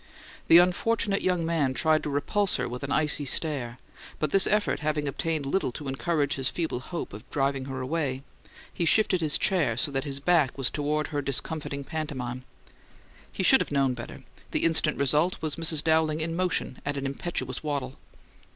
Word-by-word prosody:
The 165 Hz, -, +8 dB
unfortunate 195 Hz, +3 st, +2 dB
young 180 Hz, -3 st, +1 dB
man 150 Hz, -6 st, 0 dB
tried 155 Hz, 0 st, +3 dB
to -, -, -4 dB
repulse 185 Hz, +8 st, +1 dB
her -, -, -1 dB
with 125 Hz, +1 st, -6 dB
an 140 Hz, 0 st, -4 dB
icy 150 Hz, -1 st, +1 dB
stare, 135 Hz, -4 st, 0 dB, 0.4 s
but 155 Hz, -2 st, -1 dB
this 195 Hz, -, +5 dB
effort 210 Hz, 0 st, +1 dB
having 150 Hz, -1 st, -1 dB
obtained 155 Hz, +1 st, -2 dB
little 140 Hz, -1 st, 0 dB
to 145 Hz, -, -7 dB
encourage 145 Hz, +1 st, 0 dB
his 135 Hz, -1 st, -1 dB
feeble 165 Hz, -7 st, -2 dB
hope 170 Hz, -, -6 dB
of 110 Hz, +6 st, -11 dB
driving 135 Hz, -1 st, -1 dB
her 130 Hz, -1 st, -5 dB
away, 135 Hz, -1 st, -2 dB, 0.5 s
he -, -, -2 dB
shifted 185 Hz, 0 st, +3 dB
his 155 Hz, -2 st, +2 dB
chair 165 Hz, -, +1 dB
so 145 Hz, -, +1 dB
that 135 Hz, -1 st, -1 dB
his 140 Hz, -2 st, -3 dB
back 150 Hz, -4 st, +2 dB
was 135 Hz, -2 st, 0 dB
toward 150 Hz, +1 st, -1 dB
her 145 Hz, -2 st, -2 dB
discomfiting 140 Hz, +1 st, -2 dB
pantomime. 130 Hz, -5 st, -5 dB, 0.9 s
He -, -, -3 dB
should -, -, +6 dB
have -, -, -4 dB
known 135 Hz, -2 st, +2 dB
better, 120 Hz, -1 st, -8 dB, 0.3 s
the -, -, -1 dB
instant 160 Hz, -2 st, +3 dB
result 150 Hz, +6 st, +2 dB
was 155 Hz, -2 st, -3 dB
Mrs. 160 Hz, -2 st, +1 dB
Dowling 160 Hz, -1 st, +2 dB
in 165 Hz, +1 st, -2 dB
motion 180 Hz, -7 st, -1 dB
at 145 Hz, 0 st, -2 dB
an 140 Hz, -, -3 dB
impetuous 135 Hz, -2 st, -4 dB
waddle. 140 Hz, -4 st, -4 dB
150 Hz, 185 wpm, -27 LUFS, 135-165 Hz, 0.9 s, The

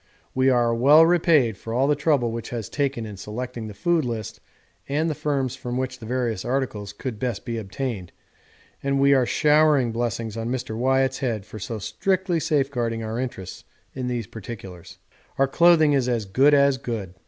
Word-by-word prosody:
We 130 Hz, +1 st, +3 dB
are 120 Hz, -2 st, +3 dB
well 145 Hz, +7 st, +6 dB
repaid 160 Hz, -, +3 dB
for 115 Hz, +2 st, -6 dB
all 130 Hz, +2 st, +3 dB
the 145 Hz, +1 st, +3 dB
trouble 145 Hz, -5 st, +1 dB
which 115 Hz, 0 st, -6 dB
was 115 Hz, -4 st, -4 dB
taken 135 Hz, -5 st, -1 dB
in 105 Hz, -2 st, -8 dB
selecting 115 Hz, +3 st, -6 dB
the 105 Hz, -, -9 dB
food 170 Hz, -, +1 dB
list 115 Hz, -3 st, -5 dB, 0.5 s
and 150 Hz, +4 st, 0 dB
the 160 Hz, -, 0 dB
firms 140 Hz, -4 st, -1 dB
from 125 Hz, -2 st, -5 dB
which 130 Hz, 0 st, -3 dB
the 110 Hz, -, -9 dB
various 120 Hz, -5 st, -1 dB
articles 120 Hz, -6 st, -2 dB
could 110 Hz, +1 st, -6 dB
best 125 Hz, 0 st, -3 dB
be 115 Hz, -1 st, -3 dB
obtained, 105 Hz, -3 st, -5 dB, 0.7 s
and 140 Hz, 0 st, 0 dB
we 140 Hz, 0 st, +5 dB
are 130 Hz, -3 st, +3 dB
showering 150 Hz, -5 st, +3 dB
blessings 115 Hz, -1 st, -3 dB
on 115 Hz, +1 st, -3 dB
Mr. 125 Hz, -3 st, -3 dB
Wyatt's 130 Hz, +2 st, +1 dB
head 115 Hz, -7 st, -2 dB
for 110 Hz, -, -9 dB
so 110 Hz, +3 st, -5 dB
strictly 175 Hz, -, -1 dB
safeguarding 125 Hz, -7 st, -1 dB
our 110 Hz, +2 st, -3 dB
interests 95 Hz, -8 st, -6 dB, 0.3 s
in 130 Hz, -1 st, -4 dB
these 120 Hz, -3 st, -2 dB
particulars. 95 Hz, -4 st, -10 dB, 0.4 s
'Our 135 Hz, -, +3 dB
clothing 160 Hz, 0 st, +5 dB
is 130 Hz, -3 st, +1 dB
as 115 Hz, -4 st, -1 dB
good 135 Hz, +9 st, +4 dB
as 140 Hz, -1 st, +3 dB
good. 110 Hz, -8 st, -5 dB
125 Hz, 185 wpm, -24 LUFS, 115-140 Hz, 0.7 s, well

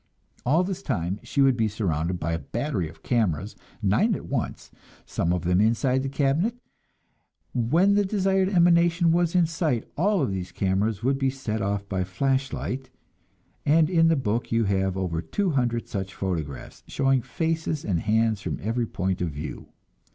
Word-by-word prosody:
All 160 Hz, +7 st, +4 dB
this 190 Hz, 0 st, -4 dB
time 90 Hz, -, -2 dB
she 140 Hz, -, -1 dB
would 135 Hz, -2 st, +5 dB
be 115 Hz, -2 st, +1 dB
surrounded 90 Hz, -5 st, -1 dB
by 85 Hz, +1 st, -2 dB
a 85 Hz, -, -1 dB
battery 115 Hz, -, -2 dB
of 80 Hz, -, -17 dB
cameras, 105 Hz, -, 0 dB, 0.3 s
nine 195 Hz, -, +3 dB
at -, -, -7 dB
once, 130 Hz, -5 st, -4 dB, 0.3 s
some 85 Hz, -, -1 dB
of 90 Hz, -2 st, -1 dB
them 90 Hz, +2 st, +3 dB
inside 125 Hz, +4 st, +2 dB
the 135 Hz, -, -2 dB
cabinet; 145 Hz, -, +1 dB, 1.0 s
and 120 Hz, -2 st, -1 dB
when 185 Hz, +5 st, +5 dB
the 205 Hz, 0 st, +3 dB
desired 195 Hz, -1 st, +1 dB
emanation 170 Hz, -2 st, +4 dB
was 170 Hz, +1 st, +1 dB
in 175 Hz, -2 st, +5 dB
sight, 155 Hz, -7 st, -1 dB
all 195 Hz, +4 st, +2 dB
these 95 Hz, -2 st, -4 dB
cameras 100 Hz, +2 st, 0 dB
would 135 Hz, +2 st, +1 dB
be 135 Hz, -1 st, +2 dB
set 125 Hz, -5 st, -3 dB
off 100 Hz, 0 st, -2 dB
by 95 Hz, -2 st, -1 dB
flashlight, 130 Hz, +5 st, -2 dB, 0.7 s
and 155 Hz, +3 st, +3 dB
in 165 Hz, -2 st, +5 dB
the 165 Hz, -, +4 dB
book 120 Hz, -4 st, -1 dB
you 115 Hz, 0 st, +3 dB
have 95 Hz, -2 st, 0 dB
over 85 Hz, -4 st, -1 dB
two 195 Hz, -, -1 dB
hundred 120 Hz, -4 st, 0 dB
such 95 Hz, -2 st, -4 dB
photographs, 80 Hz, -9 st, -4 dB
showing 135 Hz, -2 st, +2 dB
faces 160 Hz, +3 st, -2 dB
and 90 Hz, -5 st, 0 dB
hands 110 Hz, +1 st, +1 dB
from -, -, -4 dB
every 115 Hz, +2 st, -1 dB
point 95 Hz, -2 st, -2 dB
of 90 Hz, -, 0 dB
view. 75 Hz, +1 st, -7 dB
120 Hz, 175 wpm, -25 LUFS, 95-160 Hz, 1.0 s, would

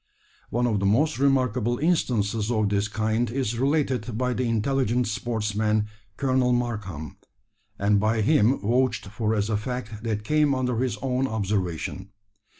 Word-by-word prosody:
One 120 Hz, +1 st, 0 dB
of 110 Hz, -4 st, +1 dB
the 100 Hz, -, -1 dB
most 145 Hz, +8 st, +2 dB
remarkable 130 Hz, -4 st, +2 dB
instances 115 Hz, -, 0 dB
of 110 Hz, -4 st, +1 dB
this 100 Hz, 0 st, +1 dB
kind 110 Hz, +2 st, 0 dB
is 120 Hz, -2 st, -2 dB
related 130 Hz, -5 st, 0 dB
by 125 Hz, 0 st, 0 dB
the 125 Hz, -1 st, -1 dB
intelligent 125 Hz, +1 st, +1 dB
sportsman, 110 Hz, -1 st, 0 dB, 0.3 s
Colonel 130 Hz, -2 st, +2 dB
Markham, 105 Hz, -11 st, -3 dB, 0.6 s
and 100 Hz, 0 st, +2 dB
by 110 Hz, +2 st, +1 dB
him 130 Hz, 0 st, +3 dB
vouched 125 Hz, +5 st, +1 dB
for 110 Hz, +1 st, -1 dB
as 105 Hz, -1 st, 0 dB
a 110 Hz, -2 st, 0 dB
fact 110 Hz, -1 st, -5 dB
that 110 Hz, -2 st, -2 dB
came 150 Hz, +3 st, +2 dB
under 125 Hz, -2 st, -1 dB
his 125 Hz, -3 st, -1 dB
own 130 Hz, 0 st, 0 dB
observation. 95 Hz, -4 st, -2 dB
115 Hz, 150 wpm, -25 LUFS, 105-130 Hz, 0.6 s, him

